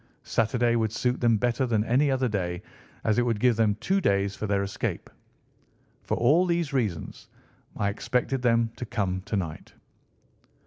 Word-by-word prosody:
Saturday 120 +1 +1
would 110 -2 +1
suit 125 +2 -1
them 115 -2 +4
better 120 +4 0
than 110 -3 +1
any 130 +6 +2
other 130 -1 +1
day, 90 -5 -2 0.4
as 110 +1 +2
it - - +4
would 115 -3 0
give 125 0 +3
them 105 -2 +2
two 195 - 0
days 100 - +1
for 110 - -4
their 100 -1 +1
escape. 100 0 -4 0.9
For - - -2
all 155 +10 +4
these 170 -4 0
reasons 105 - -2 0.5
I 100 - +1
expected 125 +5 -1
them 115 -2 +2
to 125 - -5
come 95 -6 -2
to 105 - -2
night." 85 -5 -5
115 Hz, 170 wpm, -26 LUFS, 100-125 Hz, 0.9 s, them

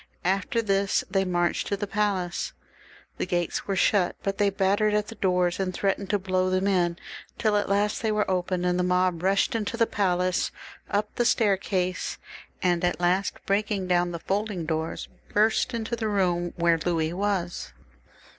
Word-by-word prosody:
After 195 +5 +1
this 195 -1 +1
they 195 -1 +2
marched 175 -1 0
to 200 - -1
the 205 - -2
palace. 195 -4 -1 0.6
The - - -2
gates 175 -2 -1
were 195 - 0
shut, 185 -1 +2
but 195 0 -2
they 205 -1 +4
battered 200 +2 +2
at 210 0 0
the - - -6
doors 180 -4 +1
and 190 -1 0
threatened 195 +1 -1
to 205 - +2
blow 185 -1 0
them 185 +1 +1
in, 175 -3 +2 0.4
till 215 -2 +1
at 205 -1 +1
last 205 +1 +1
they 220 - +1
were 210 0 +1
opened, 180 -1 -1
and 180 0 +1
the - - +2
mob 180 -1 +1
rushed 195 +2 +2
into 230 +2 -2
the 230 - +4
palace, 185 -3 +1 0.4
up 210 +1 -1
the 240 - +3
stair 220 -4 +3
case, 185 -1 -2 0.5
and 175 -1 +2
at 175 0 +1
last, 180 +3 0
breaking 200 -1 0
down 175 -1 +2
the 170 - -4
folding 195 0 -2
doors, 160 +1 -3 0.3
burst 220 +4 +3
into 230 -1 -2
the 225 -1 -2
room 180 -4 0
where 170 -1 +3
Louis 165 -2 0
was. 190 -2 -2
190 Hz, 180 wpm, -26 LUFS, 180-205 Hz, 0.6 s, they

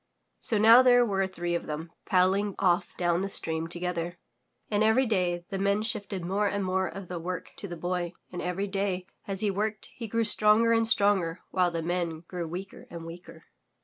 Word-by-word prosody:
'' - - -50
So 220 - +2
now 225 +4 +8
there 245 -1 +5
were 195 -3 0
three 175 -2 -4
of 170 - -3
them 160 +2 -5 0.2
paddling 190 +1 +2
off 180 -2 +1
down 175 0 +1
the 195 - -2
stream 160 -3 -2
together, 175 0 -4 0.5
and 210 0 +1
every 220 +5 +4
day 180 -6 0
the 195 - -3
Men 200 +2 +1
shifted 200 -5 -3
more 200 +3 0
and 200 -1 -2
more 190 0 0
of 190 +1 -8
the 180 -1 -5
work 180 +2 -6
to 200 - -5
the 175 -2 -7
Boy 175 +1 -3 0.2
and 180 - -5
every 180 +3 -2
day 195 -2 -2 0.2
as 195 -1 -3
he 210 -2 +1
worked 210 +2 -3
he 230 - -7
grew 230 +2 0
stronger 215 +1 +6
and 225 0 +3
stronger 195 -6 +2
while 180 -1 +2
the 165 -1 -4
Men 170 -2 -2
grew 175 0 -6
weaker 185 +4 -8
and 170 -1 -8
weaker. 170 +1 -11
185 Hz, 205 wpm, -28 LUFS, 175-205 Hz, 0.5 s, now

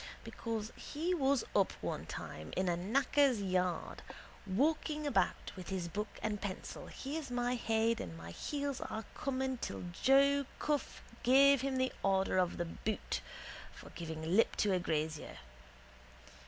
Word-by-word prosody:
Because 225 -1 -4
he 330 +5 -2
was 275 -6 +2
up 195 - +4
one - - -3
time 75 0 -6
in 185 0 +2
a 175 - +2
knacker's 255 +6 +3
yard. 185 -3 -1 0.5
Walking 300 - +1
about 285 - +1
with 185 -2 -8
his 185 -3 -2
book 210 +5 -2 0.2
and 210 -2 -1
pencil 195 -2 -5
here's 285 +1 -5
my 245 0 0
head 230 -1 +1
and 80 -1 -6
my 85 +1 -8
heels 280 - -3
are 220 -1 -4
coming 265 -2 -1
till - - -4
Joe 275 +6 +4
Cuffe 295 -4 -1 0.2
gave 275 +1 +6
him 270 0 -1
the 260 0 +1
order 190 -1 +2
of 180 -1 +1
the 175 - -1
boot 210 +5 -3 0.5
for - - -12
giving 160 -2 -6
lip 225 - +4
to 205 -2 +2
a 185 - +3
grazier. 155 -2 -2
225 Hz, 150 wpm, -35 LUFS, 185-275 Hz, 0.5 s, gave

